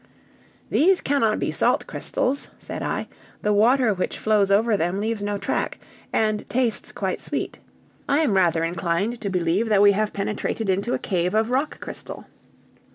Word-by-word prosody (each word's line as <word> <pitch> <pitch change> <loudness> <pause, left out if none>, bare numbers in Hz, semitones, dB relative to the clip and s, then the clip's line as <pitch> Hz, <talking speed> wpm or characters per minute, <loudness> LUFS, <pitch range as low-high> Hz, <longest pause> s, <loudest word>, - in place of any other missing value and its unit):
"These 370 +4 +4
cannot 230 -7 +1
be - - -1
salt - - +1
crystals," 275 +3 -2
said - - -7
I; - - -2 0.4
"the 210 - +2
water 230 +2 +4
which 185 - -3
flows 210 -2 +2
over 215 +3 +3
them 175 +1 -1
leaves 220 0 -2
no 205 0 -1
track, - - -2 0.3
and 215 -1 +1
tastes 245 -2 0
quite - - -3
sweet. - - -4 0.5
I 285 +3 +3
am 235 -11 +2
rather 170 -3 +3
inclined 170 +7 -1
to 200 - -2
believe 185 +4 0
that 205 -2 +5
we 205 - +8
have 210 +1 0
penetrated 210 +1 -2
into 200 +6 +1
a - - 0
cave 180 0 -1
of 220 +2 +2
rock 275 +4 0
crystal!" - - -7
210 Hz, 165 wpm, -23 LUFS, 195-230 Hz, 0.5 s, we